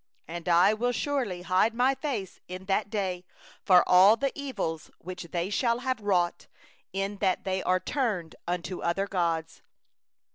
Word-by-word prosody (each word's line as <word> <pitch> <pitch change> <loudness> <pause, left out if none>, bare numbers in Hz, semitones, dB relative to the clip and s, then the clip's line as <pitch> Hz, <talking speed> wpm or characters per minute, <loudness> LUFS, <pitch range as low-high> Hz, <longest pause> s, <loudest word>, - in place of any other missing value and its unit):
18And 170 +1 -7
I 175 +4 +5
will 240 +3 0
surely 245 -10 -2
hide 190 +5 +2
My 255 +3 +3
face 260 - -4
in 185 +1 -7
that 205 +2 0
day 190 -4 -2 0.4
for 180 -2 +5
all 190 +4 +7
the 275 +3 0
evil 255 - -3 0.2
which 180 0 -8
they 175 +3 -2
shall 235 +2 +1
have 255 -3 -2
wrought, 180 -4 0 0.4
in 195 +2 -3
that 190 -2 0
they 190 -1 -1
are 185 0 +2
turned 185 - -2
unto 180 +1 -3
other 175 +3 0
gods. 165 -4 -2
190 Hz, 155 wpm, -28 LUFS, 180-225 Hz, 0.4 s, all